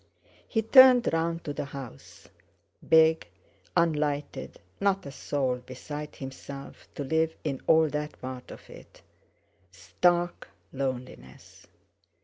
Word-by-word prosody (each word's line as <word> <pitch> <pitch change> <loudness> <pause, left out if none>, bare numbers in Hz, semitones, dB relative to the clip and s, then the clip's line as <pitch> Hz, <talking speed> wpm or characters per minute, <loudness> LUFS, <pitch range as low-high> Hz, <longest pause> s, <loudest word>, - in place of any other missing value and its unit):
He 225 -2 0
turned 255 -1 +7
round 165 +1 -1
to 145 - -4
the - - -4
house. 135 - -11 0.6
Big, 160 0 +5 0.5
unlighted, 150 -3 -1 0.2
not 195 -2 +1
a 140 - -7
soul 135 -3 -2
beside 140 +4 -8
himself 135 +1 -9
to 145 - -4
live 160 +3 0
in 140 -4 -3
all 160 0 +5
that 150 +1 -5
part 130 -1 -7
of - - -12
it. - - -15 0.7
Stark 175 - 0 0.3
loneliness! 130 - -6
150 Hz, 115 wpm, -28 LUFS, 130-165 Hz, 0.7 s, turned